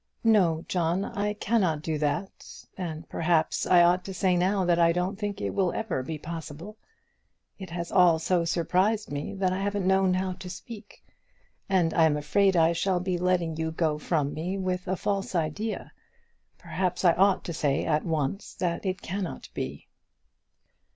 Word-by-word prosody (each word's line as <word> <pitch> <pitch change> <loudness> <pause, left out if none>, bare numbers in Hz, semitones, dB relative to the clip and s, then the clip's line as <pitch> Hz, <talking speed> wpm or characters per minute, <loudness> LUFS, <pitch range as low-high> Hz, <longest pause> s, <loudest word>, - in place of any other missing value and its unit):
"No, 180 -8 +3
John; 175 +2 0
I 205 +1 -2
cannot 190 -8 0
do 155 -2 -2
that; 150 +6 -4
and 165 -3 -5
perhaps 160 -1 +1
I 175 -1 +6
ought 180 +1 +3
to 195 - -6
say 185 -2 +2
now 185 +2 +1
that 175 -1 +3
I 170 0 +5
don't 180 +3 -1
think 205 -1 -3
it - - -2
will 185 -3 +1
ever 200 -11 -2
be 155 +4 -5
possible. 165 +5 -7 0.8
It 190 -2 -7
has 170 0 -5
all 180 -3 +5
so 170 +2 +1
surprised 185 +5 +1
me, 145 +6 -4
that 190 -1 0
I 190 - -2
haven't 200 -1 -1
known 190 -1 +3
how 185 0 -1
to 185 0 -9
speak; 205 +3 -10 0.6
and 180 -4 +2
I 165 - +5
am 150 -2 +2
afraid 190 +6 +2
I 165 0 +4
shall 180 +2 0
be 180 -1 -2
letting 175 -3 0
you 160 0 -1
go 160 -2 0
from 150 -3 -1
me 180 +5 -3
with 185 -1 -2
a 185 - 0
false 195 0 -2
idea. 175 +7 -2 0.7
Perhaps 185 0 -2
I 170 - +7
ought 195 +2 +3
to 170 - -5
say 145 -3 0
at 155 -1 +1
once 160 +3 -2
that 175 -2 -2
it 185 0 -3
cannot 190 0 -5
be." 70 +2 -5
180 Hz, 180 wpm, -27 LUFS, 160-190 Hz, 0.8 s, I